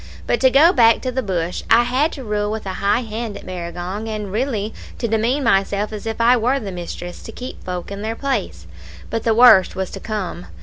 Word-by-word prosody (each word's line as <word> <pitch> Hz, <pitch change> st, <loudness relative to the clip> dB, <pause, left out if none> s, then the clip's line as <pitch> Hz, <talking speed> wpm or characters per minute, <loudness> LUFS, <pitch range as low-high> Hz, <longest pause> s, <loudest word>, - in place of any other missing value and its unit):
But -, -, +1 dB
to 260 Hz, -, +5 dB
go 305 Hz, +7 st, +6 dB
back 230 Hz, -2 st, +5 dB
to 255 Hz, -, -2 dB
the 260 Hz, +1 st, -1 dB
bush. 180 Hz, -5 st, -2 dB
I 235 Hz, +1 st, +6 dB
had 260 Hz, +6 st, +1 dB
to 270 Hz, -, -7 dB
rule 210 Hz, -2 st, -1 dB
with 220 Hz, 0 st, -4 dB
a 190 Hz, -, -3 dB
high 205 Hz, +5 st, +2 dB
hand 225 Hz, -1 st, -5 dB
at -, -, -12 dB
Barragong, 180 Hz, +4 st, -5 dB
and 210 Hz, -2 st, -4 dB
really 220 Hz, -2 st, -2 dB, 0.2 s
to 235 Hz, -, -2 dB
demean 230 Hz, +6 st, +1 dB
myself 200 Hz, -1 st, +1 dB
as 215 Hz, +1 st, -6 dB
if 225 Hz, 0 st, -4 dB
I 235 Hz, +2 st, +5 dB
were 250 Hz, +4 st, +1 dB
the 205 Hz, -5 st, -6 dB
mistress, 175 Hz, 0 st, -7 dB
to -, -, -9 dB
keep 250 Hz, +3 st, -8 dB
folk 180 Hz, +1 st, -5 dB
in 200 Hz, 0 st, -5 dB
their 220 Hz, +1 st, -3 dB
place. 225 Hz, -, -3 dB, 0.5 s
But 225 Hz, -, -2 dB
the 225 Hz, -1 st, +3 dB
worst 230 Hz, -6 st, +7 dB
was 190 Hz, -1 st, -3 dB
to -, -, -7 dB
come. 195 Hz, -, -5 dB
220 Hz, 225 wpm, -20 LUFS, 195-240 Hz, 0.5 s, worst